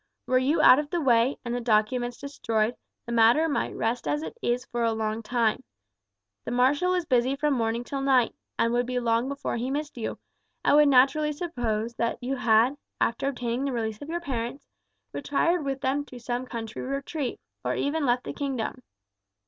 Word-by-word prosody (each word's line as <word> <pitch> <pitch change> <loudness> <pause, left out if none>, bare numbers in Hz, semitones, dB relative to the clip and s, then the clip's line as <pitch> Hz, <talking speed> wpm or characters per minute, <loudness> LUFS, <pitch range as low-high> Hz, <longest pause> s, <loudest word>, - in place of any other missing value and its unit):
Were 255 0 +3
you 275 +5 +2
out 255 - +8
of 295 -1 -3
the 345 - -1
way, 250 -2 +3
and 240 - -2
the 245 - -2
documents 240 +2 +1
destroyed, 230 -5 -1 0.3
the 235 - -6
matter 235 +7 +5
might 290 - -1
rest 225 -4 -1
as 145 +1 0
it 160 - -6
is 245 +1 0
for 240 0 -2
a 230 -1 +2
long 220 0 -2
time. 235 +1 0 0.8
The - - -5
marshal 285 +9 +2
is 355 -2 -1
busy 255 -1 +2
from 295 +1 +1
morning 230 -1 0
till 275 +2 -4
night, 265 -3 +3 0.2
and 230 +1 +2
would 245 0 +1
be 250 0 -1
long 235 +1 +1
before 280 -3 -3
he 245 +3 -2
missed 290 -2 -4
you, 220 - -3 0.5
and - - +5
would 300 0 +7
naturally 280 +3 +4
suppose 240 -9 -2
that 230 0 0
you 265 +2 -3
had, 240 +3 +3 0.2
after 230 +4 0
obtaining 245 -1 -2
the 275 - -1
release 220 -2 -3
of 290 - -8
your 345 +1 -2
parents, 250 -3 -4 0.5
retired 325 +4 +1
with 275 -1 -3
them 275 +2 0
to 255 - -11
some 245 +2 -3
country 225 -3 -6
retreat, 275 0 -3 0.2
or - - -1
even 300 +2 -1
left 245 -1 +2
the - - -5
kingdom. 260 -3 -3
250 Hz, 195 wpm, -27 LUFS, 230-280 Hz, 0.8 s, out